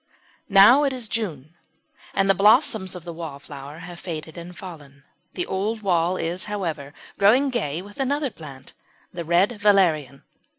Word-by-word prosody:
] - - -36
Now 255 +8 +7
it 275 -2 +1
is 250 -3 -4
June, 165 - -4 0.6
and 195 - +2
the 195 - +5
blossoms 210 - +3
of 180 - -8
the 170 -1 -7
Wallflower 145 -2 -9
have 175 -1 -10
faded 160 -3 -7
and 175 +1 -10
fallen. 145 -7 -11 0.3
The 180 - -2
old 210 +3 -3
wall 180 -1 +1
is, 175 +3 -3
however, 165 -9 -4 0.2
growing 250 +8 +4
gay 175 - -2
with 205 +4 -13
another 280 0 0
plant 140 -7 -12 0.4
the 170 - -5
Red 185 +7 +2
Valerian. 165 -10 +2
180 Hz, 160 wpm, -23 LUFS, 160-210 Hz, 0.6 s, Now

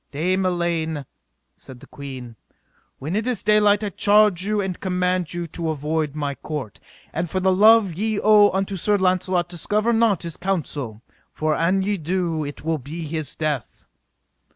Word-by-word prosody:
Dame 185 +6 0
Elaine, 165 -4 -1 0.5
said 130 -2 -12
the - - -14
queen, 130 -4 -9 0.6
when 155 +7 -4
it 220 +3 -1
is 245 -5 -2
daylight 210 0 +4
I 205 - -1
charge 205 -2 +3
you 210 +1 0
and 190 -3 -3
command 180 -2 -1
you 175 -2 -3
to 165 0 -4
avoid 155 0 -2
my 145 -2 -2
court; 140 -7 -6 0.3
and 170 +1 -2
for 185 - -1
the 190 0 +3
love 215 -1 +5
ye 215 +4 -1
owe 210 -1 +6
unto 195 +1 -2
Sir 205 +4 +2
Launcelot 185 -1 +1
discover 210 +6 0
not 225 -5 +2
his 170 -2 -6
counsel, 145 - -3 0.3
for 155 0 -1
an 180 +5 +1
ye 205 +1 0
do, 170 -1 -1
it 145 +1 -7
will 160 -1 0
be 160 +5 -7
his 155 -2 -5
death. 150 -7 -3
175 Hz, 170 wpm, -22 LUFS, 155-200 Hz, 0.6 s, owe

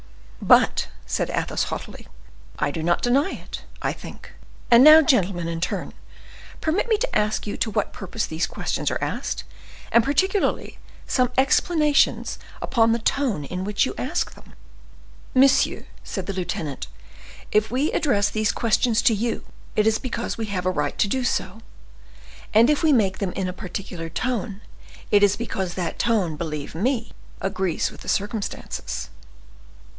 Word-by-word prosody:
"But," - - +4 0.2
said - - -1
Athos, - - -1
haughtily, - - -7 0.5
"I 145 - 0
do 160 - -4
not 170 +2 +1
deny 270 +8 +3
it, - - -7 0.2
I - - 0
think; - - -11 0.4
and 235 +1 +8
now, 310 +2 +10
gentlemen, 190 - +2
in 165 0 -3
turn, - - -3 0.7
permit 335 +9 0
me 440 - +4
to - - -2
ask 210 0 +1
you 205 - -3
to - - 0
what 210 -1 -1
purpose 205 +3 -3
these 160 +2 -2
questions - - -2
are - - -1
asked, - - -3 0.5
and 235 - +5
particularly 380 - 0 0.3
some 250 -2 +1
explanations 300 +2 +2 0.2
upon 230 -2 +3
the 230 - +2
tone 230 - 0
in 180 +6 -4
which 205 +1 +1
you - - -3
ask - - -2
them?" - - -17 0.8
"Monsieur," 270 +1 +4 0.2
said 190 - -5
the 195 - -3
lieutenant, 165 -6 -4 0.6
"if 215 +1 +2
we 265 +7 0
address 205 -9 +1
these 215 -1 +1
questions 230 0 +1
to 250 -5 +5
you, 225 +2 -2 0.3
it 210 - +3
is 220 0 +3
because 240 -2 -3
we 225 -1 -4
have 185 -3 -3
a 185 - +2
right - - -2
to - - +3
do 260 +5 -1
so, 205 -4 -1 1.0
and 230 +6 +7
if 300 - +1
we 320 -2 +4
make 200 -8 +2
them 190 -3 -2
in 190 -1 -2
a 180 - -3
particular 180 -2 -6
tone, 210 0 -3 0.5
it 205 - +5
is 205 0 +5
because 190 -6 -4
that 175 -3 -3
tone, 200 -9 +1
believe 150 -2 -5
me, 225 - -1 0.3
agrees 190 -3 -1
with - - -14
the - - -7
circumstances." 205 +1 -3
215 Hz, 160 wpm, -23 LUFS, 185-255 Hz, 1.0 s, now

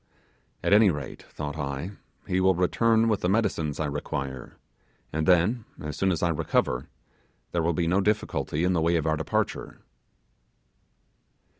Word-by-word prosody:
At - - +3
any 105 0 +7
rate, 75 -6 -4
thought 75 0 -5
I, 70 +5 -3 0.3
he 90 - 0
will 95 0 +4
return 110 +5 +3
with 105 -3 +1
the 90 - +1
medicines 85 -8 0
I 80 - 0
require, 70 -3 -4 0.6
and 80 +2 -1
then, 95 +7 +3 0.2
as 75 -1 -5
soon 95 +2 +1
as 85 - -1
I 85 - +3
recover, 70 -5 0 0.6
there 85 - 0
will 85 +1 +1
be 85 +2 0
no 90 +4 +2
difficulty 100 -6 0
in 90 +1 +2
the 85 - +1
way 85 +1 +2
of 80 - 0
our 80 -1 +2
departure. 80 - -2
85 Hz, 160 wpm, -27 LUFS, 75-95 Hz, 0.6 s, any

